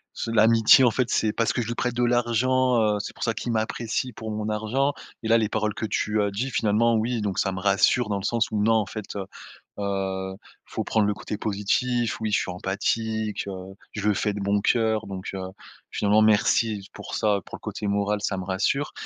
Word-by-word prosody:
s - - -4
l'amitié 115 +2 +6
en 125 - +5
fait, 125 +1 0
c'est 110 - +1
parce 115 +1 0
que 125 - 0
je 115 - -4
lui 120 - -3
prête 125 0 -1
de 120 0 0
l'argent, 120 +1 +2
heu, 105 -1 +2
c'est - - -6
pour - - -7
ça 115 - +1
qu'il 120 +3 -4
m'apprécie 115 +3 -2
pour 110 +1 -7
mon 105 0 -3
argent 120 +7 0 0.3
et - - -2
là 115 - +6
les 110 - +1
paroles 105 0 -1
que - - -3
tu 105 0 0
as 100 -1 0
dit, 120 +7 -2
finalement, 115 +1 +2
oui, 115 +1 0
donc 100 -2 -2
ça 95 - +1
me 95 - -4
rassure 100 +4 +3
dans 100 - 0
le 95 - -6
sens 115 +1 +1
où, 105 -1 0
non, 115 +2 +4
en 110 -2 +2
fait, 105 0 -7
heu 95 - -3 0.5
heu, 95 -1 -2 0.3
faut - - -4
prendre 110 -2 +2
le 105 - +1
côté 105 - -5
positif, 110 +4 0
oui, 110 - -1
je - - +4
suis - - -3
empathique, 105 +4 -2
heu, 95 0 -7 0.2
je 105 0 -3
le 105 - +4
fais 105 +2 0
de 105 - -5
bon 100 +1 +1
cœur, 110 -1 +1
donc 95 -1 -6
heu, 95 - -4 0.5
finalement, 105 +1 +3
merci 105 -1 +2
pour - - -7
ça, 105 -2 +2
pour - - -8
le - - -28
côté 105 - -4
moral, 100 +1 0
ça 100 -2 -1
me 95 - -4
rassure 100 +10 0
110 Hz, 230 wpm, -25 LUFS, 100-115 Hz, 0.5 s, l'amitié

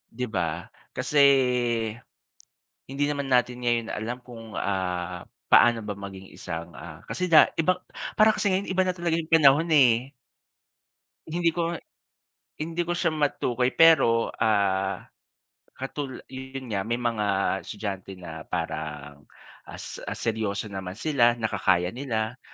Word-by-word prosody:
'Di 125 - -3
ba? 90 - +1 0.5
Kasi, 150 - -1 1.7
Hindi 135 +1 -2
naman 140 -1 -3
natin 125 0 +2
ngayon 120 -1 +1
alam 115 +4 -4
kung, 115 -3 -11
ah, 90 -2 -2 0.3
paano 120 -1 +6
ba 105 - -3
maging 95 -1 -9
isang, 85 -1 -6
ah - - -10
kasi 185 - -2
da 155 - +8
iba 180 +3 +2 0.4
parang 215 +1 +7
kasi - - 0
ngayon 190 +1 -1
iba 185 0 +2
na 180 - 0
talaga 170 -2 0
'yong 160 - -5
panahon, 155 0 +6
eh. 125 -1 +4 1.2
Hindi 170 +1 +1
ko 170 0 -2 0.9
hindi 165 +2 -2
ko 175 - -1
siya 175 -1 +1
matukoy. 130 -5 0
Pero, 155 -9 +5
ah, 100 -3 +1 0.7
katul 135 -1 -6
yo 130 - -6 0.2
'yon 130 -3 -6
nga, 100 -2 0
may 115 - 0
mga 120 -3 -1 0.4
estudyante 100 -2 -6
na 80 -3 -9
parang, 75 -4 -5 0.4
ah, - - -9
s - - -7
ah, - - -3
seryoso 110 -2 -2
naman 95 -1 -6
sila 120 -2 +2
nakakaya 95 -5 +1
nila, 120 -1 -3
120 Hz, 140 wpm, -26 LUFS, 95-145 Hz, 1.7 s, da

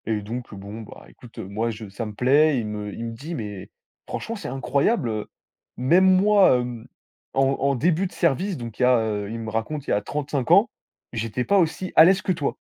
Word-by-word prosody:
Et 110 -2 0
donc, 120 +3 -6
bon 100 +3 -8
bah 110 - -12
écoute 120 -2 -17
moi 105 +5 -3
je 110 -1 -7
ça 105 +4 -5
me 105 - -8
plaît, 140 +6 +3
il 115 - -3
me 105 -1 -5
il 115 - -6
me 115 - -4
dit: 150 +9 -7
«Mais 105 -6 -6 0.4
franchement 230 - -4
c'est 200 - -7
incroyable, 135 - 0
heu, 110 -1 -3 0.5
même 170 +10 +4
moi, 195 -10 +5
mmh, 120 -2 -7 0.5
en 135 - +3 0.2
en 140 0 +1
début 170 +7 +1
de - - -16
service, 175 +4 0
donc 115 -3 -8
il - - -3
y - - +5
a» 125 0 +5
heu, 105 -2 -2
il 115 +1 -5
me 110 -1 -5
raconte, 135 +6 -3
il - - -1
y - - +4
a 105 - +1
35 140 +3 -3
ans: 200 +6 +6 0.4
«J'étais 115 +2 -2
pas 200 - +3
aussi 180 +2 -1
à 160 - +9
l'aise 190 +2 +4
que - - 0
toi». 150 -5 -2
125 Hz, 225 wpm, -24 LUFS, 110-160 Hz, 0.5 s, à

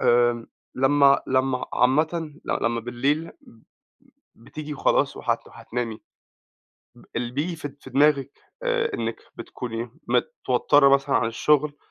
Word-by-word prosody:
آآ 120 -1 +3 0.3
لمّا 140 +1 +4
لمّا 130 0 0
عامةً 155 +4 +1
لمّا 115 0 -1
بالليل 140 +7 -1
ب 115 -1 -20 0.7
بتيجي 150 +6 -8
وخلاص - - +1
وهت - - -2
وهتنامي، 115 -2 -5 0.9
ب - - -18
اللي 120 +1 -2
بييجي 165 +5 -2
في 145 -2 -5
د 140 - -17
في - - -12
دماغِك 140 -1 +3 0.3
آآ 475 -3 0
إنِك - - -2 0.2
بتكوني 120 -1 -6 0.2
متوتّرة 145 - +3
مثلًا 140 0 +3
عن 115 - +1
الشُّغل 150 +4 +1
135 Hz, 125 wpm, -24 LUFS, 120-150 Hz, 0.9 s, لمّا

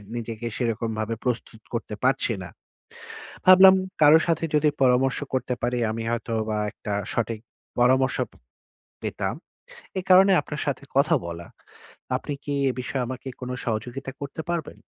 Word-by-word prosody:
নিজেকে 115 -1 -5
সেরকমভাবে 115 -2 -2
প্রস্তুত 120 -2 -3
করতে 115 -2 -3
পারছি 130 -2 +2
না। 90 - -8 1.0
ভাবলাম 190 +1 +9 0.3
কারো 150 +2 +8
সাথে 165 -1 +1
যদি 150 0 +4
পরামর্শ 130 +1 +3
করতে 130 -1 0
পারি, 125 +1 0
আমি 115 +1 -4
হয়তোবা 110 -2 -2
একটা 105 - -6 0.2
সঠিক 115 -1 -1 0.4
পরামর্শ 130 +1 +3 0.9
পেতাম। - - -2 0.6
এই 185 - -3
কারণে 190 +2 +8
আপনার 150 -1 -6
সাথে 140 -1 -2
কথা 150 +4 +4
বলা। 85 0 -7 0.7
আপনি - - -5
কি 145 - -3 0.2
এ - - -1
বিষয়ে 125 0 -2
আমাকে 130 +1 -6
কোন 125 -1 -5
সহযোগিতা 120 +4 -3
করতে 140 +3 -5
পারবেন? 170 -4 -3
125 Hz, 135 wpm, -25 LUFS, 115-140 Hz, 1.0 s, ভাবলাম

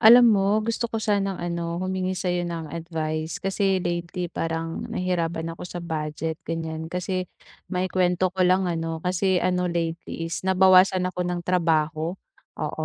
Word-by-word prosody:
Alam 235 +1 +9
mo 205 +2 +2
gusto 230 +1 -1
ko 225 - -3
sanang, 200 -3 0
ano, 170 -1 -3
humingi 185 +1 -1
sa 180 -1 -1
'yo 175 - 0
ng 165 -2 -5
advice. 160 -1 -3
Kasi 195 -1 0
lately 175 0 -3
parang 165 0 -3
nahirapan 165 -2 -1
ako 165 - -10
sa - - -7
budget, 160 0 -3
ganiyan. 160 -1 -4
Kasi 180 +1 -2 0.4
maikuwento 185 -1 +1
ko 190 - -4
lang, 185 +1 +4
ano, 165 -2 -2
kasi, 185 +1 +2
ano, 180 -1 +1
lately 165 -1 -3
is 165 - -3
nabawasan 185 0 +5
ako 185 0 -3
ng 175 0 -1
trabaho. 165 -1 +1 0.4
Oo, - - -3
180 Hz, 155 wpm, -25 LUFS, 165-185 Hz, 0.4 s, Alam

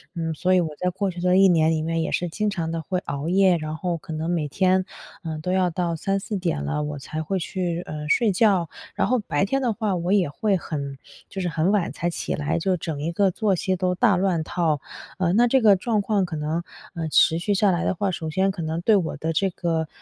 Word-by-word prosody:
嗯， 165 -1 -2
所 185 +4 +2
以 - - +5
我 165 -3 0
在 180 - +1
过 195 +1 -2
去 175 0 -7
的 180 +1 +3
1 195 - +7
年 160 -3 +4
里 155 -1 0
面 165 0 -1
也 - - -2
是 175 - 0
经 210 +4 0
常 165 -5 -3
的 165 - -3
会 180 +4 -2
熬 140 -3 -5
夜， 185 -1 +4
然 155 -1 -4
后 175 +1 -2
可 160 0 -8
能 160 +2 -3
每 165 -4 0
天， 185 +4 +2 0.4
嗯， 160 -2 -4
都 180 - -2
要 185 -1 +2
到 170 0 -2
3-4 195 +4 -2
点 170 - -2
了， 75 - -1
我 150 0 -4
才 155 +3 -5
会 190 +5 -2
去， 175 -1 -2
呃， 150 -1 -6
睡 220 +3 +3
觉。 190 -4 +3 0.3
然 - - +1
后 255 0 +2
白 160 -8 -1
天 270 +6 0
的 240 -4 +1
话 210 -3 -1
我 175 +3 0
也 190 -7 +3
会 200 +7 0
很 140 -5 -5 0.3
就 190 - -5
是 180 - -1
很 165 +3 +1
晚 205 -4 +1
才 175 - -2
起 - - -3
来， 145 -1 -1
就 185 +1 +1
整 155 -3 -4
一 160 +3 -1
个 190 +2 +2
作 205 0 +1
息 185 +2 -1
都 180 0 0
大 210 0 +4
乱 180 -3 +1
套。 160 -3 0 0.4
呃， 180 -2 +1
那 240 +4 +5
这 265 +2 +3
个 210 -3 +6
状 215 +2 0
况 200 -1 +1
可 175 -2 -6
能， 155 +3 -2 0.3
嗯， 160 -2 -3
持 160 +1 +5
续 195 +5 0
下 200 +1 +3
来 175 -1 0
的 - - +1
话， 195 +1 -1
首 160 -3 -4
先 190 +5 +1
可 185 -2 -6
能 160 +1 -2
对 215 +3 +4
我 175 -5 -1
的 160 +1 -2
这 195 +5 +1
个， 165 -3 -2
175 Hz, 265 characters per minute, -24 LUFS, 160-195 Hz, 0.4 s, 1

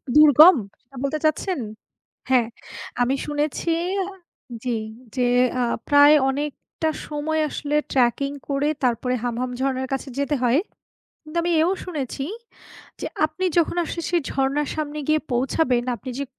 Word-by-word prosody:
দুর্গম, 305 +4 +9 0.3
এটা 270 - -20
বলতে 290 +3 0
চাচ্ছেন? 330 +3 0 0.7
হ্যাঁ, 250 -3 +4 0.5
আমি 250 +2 +2
শুনেছি 300 +3 -1 0.9
জি, 245 -3 -1 0.4
যে 250 -1 +2 0.3
আ - - +2 0.3
প্রায় 290 +1 +7
অনেকটা 295 +3 -3 0.2
সময় 310 +1 -1
আসলে 295 0 -3 0.2
tracking 275 +3 +1
করে 280 +1 +1
তারপরে 250 +1 +1
হামহাম 245 +1 -2
ঝরনার 265 -1 -1
কাছে 270 +1 -3
যেতে 280 +1 0
হয়। 245 +4 +4 0.6
কিন্তু 305 +2 -10
আমি 345 - 0
এও 345 +3 +2
শুনেছি 275 -5 -4 0.8
যে - - -3 0.2
আপনি 310 +4 -5
যখন 340 0 +1
আসলে 335 +1 -5
সেই 345 -2 +2
ঝরনার 275 +2 0
সামনে 300 -1 -3
গিয়ে 310 0 +3
পৌঁছাবেন 250 0 +1
আপনি 235 +4 -8
যে 280 - -1
285 Hz, 135 wpm, -23 LUFS, 260-310 Hz, 0.9 s, দুর্গম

